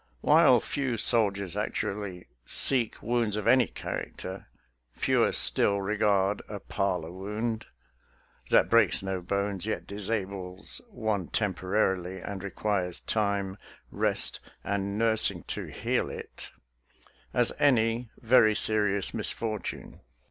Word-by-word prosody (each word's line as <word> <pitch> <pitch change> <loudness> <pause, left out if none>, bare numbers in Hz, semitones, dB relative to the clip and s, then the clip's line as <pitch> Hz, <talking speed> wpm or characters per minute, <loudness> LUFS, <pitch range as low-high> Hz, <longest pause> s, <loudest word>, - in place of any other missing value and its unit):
While - - +5
few 135 -4 -2
soldiers 100 -5 +1
actually 95 -3 -4 0.2
seek 125 - +1
wounds 115 -2 0
of 105 - -3
any 130 -4 +5
character, 95 +1 -7 0.5
fewer - - +2
still 100 0 +4
regard 100 0 +1
a 105 -1 -6
parlor 90 -4 -2
wound 105 +5 -4 0.4
— - - -28
that - - +4
breaks - - +3
no 95 -1 -3
bones, 100 +1 -2
yet 110 - -3
disables 100 -2 -3
one 110 - -2
tem 105 -4 -1
porarily, 95 -1 -1
and 95 +1 -7
requires 95 -3 -2
time, 100 -2 -2 0.3
rest, - - +1 0.2
and 100 0 -2
nursing 110 -1 +3
to - - -3
heal - - -2
it - - -9 0.4
— - - -26
^as 120 -1 +5
any 115 -3 +2
very 110 -2 +5
serious 105 -3 +3
misfortune. 110 -2 -1
100 Hz, 120 wpm, -28 LUFS, 95-110 Hz, 0.5 s, While